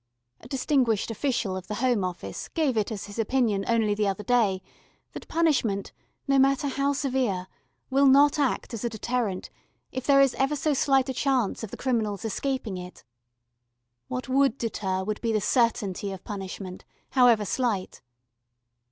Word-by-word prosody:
A -, -, -13 dB
distinguished 255 Hz, -5 st, +1 dB
official 235 Hz, -5 st, -1 dB
of 185 Hz, -1 st, -7 dB
the 210 Hz, -, -3 dB
Home 240 Hz, -3 st, +1 dB
Office 180 Hz, -1 st, -5 dB
gave 305 Hz, -7 st, 0 dB
it 215 Hz, 0 st, 0 dB
as 210 Hz, -3 st, -5 dB
his 205 Hz, +2 st, -9 dB
opinion 225 Hz, -3 st, +1 dB
only 225 Hz, -3 st, +2 dB
the 210 Hz, 0 st, 0 dB
other 195 Hz, +1 st, -2 dB
day 205 Hz, -5 st, +2 dB, 0.5 s
that -, -, -8 dB
punishment, 265 Hz, -12 st, +1 dB, 0.4 s
no 275 Hz, -1 st, +4 dB
matter 275 Hz, +1 st, +3 dB
how 275 Hz, +1 st, 0 dB
severe, 255 Hz, -9 st, -1 dB, 0.5 s
will 275 Hz, +1 st, +5 dB
not 285 Hz, +3 st, +5 dB
act 270 Hz, -2 st, 0 dB
as 230 Hz, -, -5 dB
a 235 Hz, -, 0 dB
deterrent, 220 Hz, -3 st, -2 dB, 0.4 s
if 260 Hz, -1 st, -5 dB
there 280 Hz, -1 st, +6 dB
is 275 Hz, -2 st, +5 dB
ever 270 Hz, +2 st, +2 dB
so 300 Hz, +1 st, 0 dB
slight 270 Hz, -1 st, +3 dB
a 265 Hz, -, -2 dB
chance 260 Hz, -5 st, 0 dB
of 220 Hz, -, -5 dB
the -, -, -8 dB
criminal's 220 Hz, -6 st, -1 dB
escaping 225 Hz, -3 st, -2 dB
it. 180 Hz, 0 st, -10 dB, 1.0 s
What 250 Hz, -, -4 dB
would 270 Hz, -1 st, +2 dB
deter 190 Hz, -5 st, -2 dB
would 210 Hz, +2 st, -3 dB
be 230 Hz, -, 0 dB
the 215 Hz, -, +2 dB
certainty 210 Hz, -3 st, 0 dB
of 190 Hz, -2 st, -8 dB
punishment, 190 Hz, -2 st, -7 dB, 0.3 s
however 240 Hz, -5 st, +5 dB
slight. 205 Hz, -1 st, -2 dB
235 Hz, 165 wpm, -26 LUFS, 205-270 Hz, 1.0 s, there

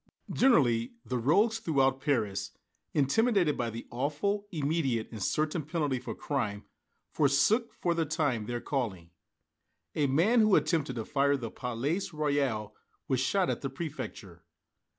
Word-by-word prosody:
Generally, 125 Hz, -, +3 dB
the 125 Hz, -1 st, -2 dB
rogues 205 Hz, -, +3 dB
throughout 135 Hz, -9 st, +1 dB
Paris, 110 Hz, -9 st, -1 dB, 0.4 s
intimidated 175 Hz, -, +2 dB
by 120 Hz, -1 st, -2 dB
the 115 Hz, +1 st, -7 dB
awful, 150 Hz, +11 st, -1 dB
immediate 145 Hz, -, 0 dB
and 110 Hz, -3 st, -7 dB
certain 155 Hz, -, 0 dB
penalty 145 Hz, -3 st, -1 dB
for 130 Hz, -, -6 dB
crime, 105 Hz, -8 st, -2 dB, 0.5 s
forsook, 180 Hz, -, +3 dB
for 175 Hz, -, 0 dB
the 165 Hz, -1 st, +1 dB
time, 145 Hz, -9 st, -1 dB
their 120 Hz, 0 st, -3 dB
calling. 100 Hz, -, -3 dB, 0.8 s
A 145 Hz, -2 st, +1 dB
man 175 Hz, -, +3 dB
who 215 Hz, -2 st, +5 dB
attempted 150 Hz, -7 st, +1 dB
to 115 Hz, -2 st, -4 dB
fire 140 Hz, 0 st, +2 dB
the 115 Hz, -4 st, -6 dB
Palais 130 Hz, +9 st, -2 dB
Royal 140 Hz, -8 st, -1 dB, 0.3 s
was 130 Hz, -, +1 dB
shot 180 Hz, +8 st, +1 dB
at -, -, -4 dB
the 135 Hz, -, -2 dB
Préfecture. 130 Hz, -, -7 dB
140 Hz, 140 wpm, -30 LUFS, 120-165 Hz, 0.8 s, who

